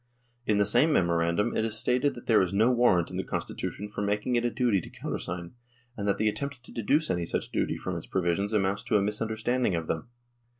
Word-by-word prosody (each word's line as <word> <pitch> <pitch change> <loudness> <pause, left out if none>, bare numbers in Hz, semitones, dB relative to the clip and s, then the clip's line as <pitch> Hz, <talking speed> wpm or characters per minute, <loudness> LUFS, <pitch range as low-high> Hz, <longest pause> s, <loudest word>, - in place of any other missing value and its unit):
In 105 - +3
the 100 - +4
same 120 +10 +4
memorandum 85 - +2
it - - +1
is 110 -1 -1
stated 125 +4 +1
that 120 - -10
there 110 -4 +5
is 95 +1 -1
no 110 +5 +4
warrant 120 -9 +3
in - - -5
the - - -1
Constitution 105 - -4
for 105 0 -5
making 105 +4 0
it 120 - +2
a 120 - +2
duty 120 -6 +1
to - - -10
countersign, 85 0 -5 0.4
and 105 -3 -3
that 100 - +2
the 110 - +1
attempt 140 +3 -3
to - - -13
deduce 145 +8 +1
any 90 -1 0
such - - -3
duty - - 0
from - - -4
its - - -6
provisions 95 +3 0
amounts 100 -2 +1
to 110 - +3
a - - +2
misunderstanding 110 +1 0
of 80 -1 -2
them. 80 +6 -3
105 Hz, 225 wpm, -28 LUFS, 95-120 Hz, 0.4 s, there